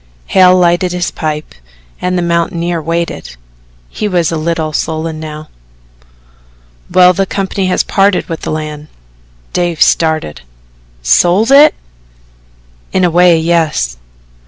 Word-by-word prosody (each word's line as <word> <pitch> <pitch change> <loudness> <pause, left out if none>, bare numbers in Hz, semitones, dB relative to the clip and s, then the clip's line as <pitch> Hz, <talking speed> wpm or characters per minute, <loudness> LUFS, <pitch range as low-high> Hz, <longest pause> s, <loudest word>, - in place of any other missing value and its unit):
Hale 185 -1 +4
lighted 175 0 +1
his 180 -1 -2
pipe 155 -1 -4 0.5
and 180 0 -1
the 175 - 0
mountaineer 170 0 -1
waited 165 - -4 0.5
he 210 - -4
was 175 -5 0
a - - -2
little 160 -1 -2
sullen 160 +1 -3
now. 155 0 -8 1.4
"Well, 180 0 +5
the 195 +2 -1
company 195 0 -2
has 185 - +1
parted 195 -1 +1
with 165 -2 -5
the - - -5
land." 155 -1 -5 0.7
Dave 175 -2 -1
started. 160 - +1 0.6
"Sold 180 - +3
it?" 290 +2 +6 1.2
"In 185 - 0
a 175 - +2
way 175 0 +4
yes." 160 - 0
170 Hz, 125 wpm, -13 LUFS, 155-180 Hz, 1.4 s, it